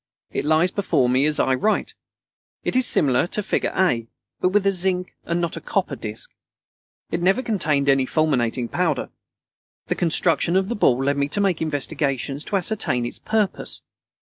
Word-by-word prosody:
It - - -2
lies 160 +4 +3
before 160 -10 +1
me 130 +4 +3
as 155 - +1
I 130 - +2
write. 210 +12 0 0.7
It - - -2
is 255 -2 +3
similar 135 +1 +2
to 210 - -3
figure - - -1
A, 120 -12 +1 0.3
and 185 - +2
with 205 0 +2
a 195 - +4
zinc 180 -1 -1
and 170 +1 -1
not 170 -1 -2
a - - -6
copper - - -1
disc. - - -7 0.8
It 170 - -1
never 195 +8 +2
contained 155 - 0
any 135 -1 +3
fulminating 125 -6 0
powder. - - -1 0.8
The - - +2
construction 170 0 +2
of 190 +1 +2
the 240 - -1
ball 130 -9 +2
led 140 +1 +1
me 140 0 0
to 205 - -1
make 195 -5 +1
investigations 145 -2 -1
to 205 - -2
ascertain 180 - 0
its 120 - -5
purpose. 215 -3 -2
160 Hz, 175 wpm, -22 LUFS, 140-190 Hz, 0.8 s, a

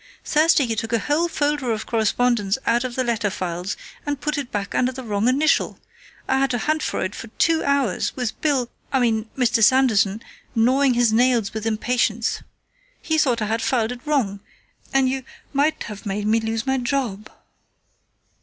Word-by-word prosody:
Thursday 305 -1 +4
you 230 -3 -1
took 225 +1 -3
a - - +4
whole 295 +8 +1
folder 290 -6 -1
of 220 -1 -2
correspondence 225 -2 +1
out 235 +1 +2
of 250 -1 -4
the 255 - 0
letter 230 -3 0
files 180 0 -4 0.3
and 290 -2 -3
put 300 +1 -2
it 280 -4 -4
back 200 -1 -3
under 255 0 +1
the 260 0 -8
wrong 210 -1 0
initial. 290 +5 +2 0.5
I 265 - +2
had 270 0 +2
to 245 - 0
hunt 310 +6 0
for - - -2
it 185 - -3
for 225 - -8
two 325 -1 +3
hours, 280 -8 +1
with 245 -4 -4
Bill 270 -6 +1 0.2
I 265 - +2
mean, 225 -2 +1
Mr. 240 -3 +2
Sanderson 220 -4 +3 0.3
gnawing 255 +3 +3
his 240 -2 +3
nails 235 -3 +2
with 220 0 -3
impatience. 230 0 0 0.6
He 315 -1 0
thought 245 -7 +2
I - - 0
had 225 +2 -1
filed 235 -3 +1
it 250 -1 -7
wrong, 260 -10 0 0.5
and 270 -1 +3
you 265 +1 -1 0.3
might 290 +3 +1
have 210 -2 -8
made 205 +1 -2
me 220 +2 +3
lose 225 +1 -2
my 265 0 +1
job." 240 -5 -2
240 Hz, 185 wpm, -22 LUFS, 220-270 Hz, 0.6 s, Thursday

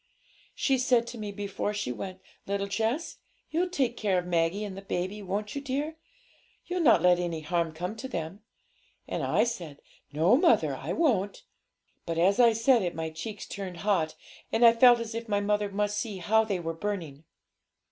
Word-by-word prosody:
'She 270 -2 +1
said 245 -2 +3
to 235 -1 -8
me 210 -1 -4
before 205 +1 -3
she 205 -11 -2
went, 185 +9 -6 0.3
"Little 200 0 -1
Jess, 225 - -2 0.3
you'll 350 +3 +1
take 270 -9 0
care 200 -4 +1
of 180 - -1
Maggie 175 +3 0
and 195 -1 -7
baby, 190 +4 -2
won't 205 +2 -3
you, 280 - -4
dear? 285 +3 -3 0.7
You'll 360 +1 -2
not 230 - +5
let 180 -1 +5
any 170 -3 -2
harm 170 +1 -1
come 180 +6 -5
to 265 - -5
them?" 175 -3 -5 0.7
And - - -3
I - - +2
said, 170 -11 -4 0.3
"No, 165 +10 +4
mother, 335 +5 +3
I - - -5
won't." 215 - 0 0.6
But 165 -1 -2
as 190 +6 +3
I 235 -2 +7
said 230 +2 +4
it 175 -3 -2
my 160 0 -3
cheeks 200 +6 -6
turned 185 -4 -7
hot, 165 -7 +1 0.4
and 235 +1 +4
I 230 - +8
felt 240 0 +7
as 230 -1 -5
if 230 0 -5
my 205 -1 +2
mother 205 0 0
must 205 +1 -1
see 215 -5 -4
how 220 +5 +2
they 200 -4 -1
were 165 -1 -3
burning. 165 -5 -5
205 Hz, 190 wpm, -28 LUFS, 180-230 Hz, 0.7 s, I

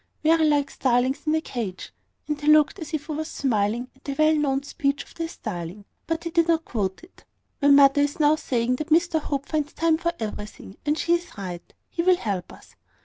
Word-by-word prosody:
very 320 0 +4
like 290 -2 +2
starlings 255 +3 0
in 310 - +3
a 315 - +1
cage;" 220 -11 -5 0.3
and 300 -1 -3
he 295 - -4
looked 305 +4 +5
as 315 -2 -7
if 310 -3 -3
he - - -6
was 310 +1 -3
smiling 235 -1 0
at 265 - -27
the 275 - -4
well 310 0 +4
known 280 -3 +1
speech 280 -1 -1
of - - -19
the 330 -1 -3
starling; 195 - -6 0.2
but 330 0 -2
he 335 - -4
did 335 0 +3
not 330 -1 +2
quote 200 - -3
it. 345 - -18 0.4
"My 285 - +4
mother 280 0 +7
is 290 +1 -1
now 300 0 +5
saying 250 -4 -1
that 305 +2 -5
Mr 325 0 +3
Hope 280 -2 -3
finds 300 -1 -2
time 325 -1 +2
for 340 0 0
everything: 210 -2 -7
and 300 +1 +2
she 340 - +1
is 345 -6 -2
right. 180 -3 -7 0.2
He 335 - -2
will 365 +1 +4
help 195 - -3
us. - - -16
290 Hz, 220 wpm, -24 LUFS, 245-315 Hz, 0.4 s, mother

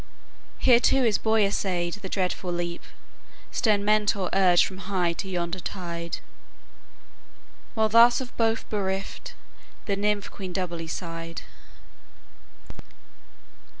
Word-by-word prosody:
Here 245 -2 +5
too 265 +2 +3
his 220 -4 +2
boy 220 -1 +3
essayed 180 -3 -1
the 205 -2 -6
dreadful 185 -1 -2
leap, 175 0 -3 0.7
Stern 205 -3 +2
Mentor 205 -3 +2
urged 185 -2 +5
from 190 -1 -8
high 180 -3 +1
to 190 +3 -5
yonder 175 0 -2
tide; 170 -2 -5 1.6
While 220 -1 +2
thus 235 +2 +7
of 255 -2 -7
both 225 -1 0
bereft 195 - -3 0.5
the 200 - 0
nymph 205 0 -1
queen 185 -3 -7
doubly 170 -3 -3
sighed." 165 -1 -6
195 Hz, 115 wpm, -26 LUFS, 175-215 Hz, 1.6 s, thus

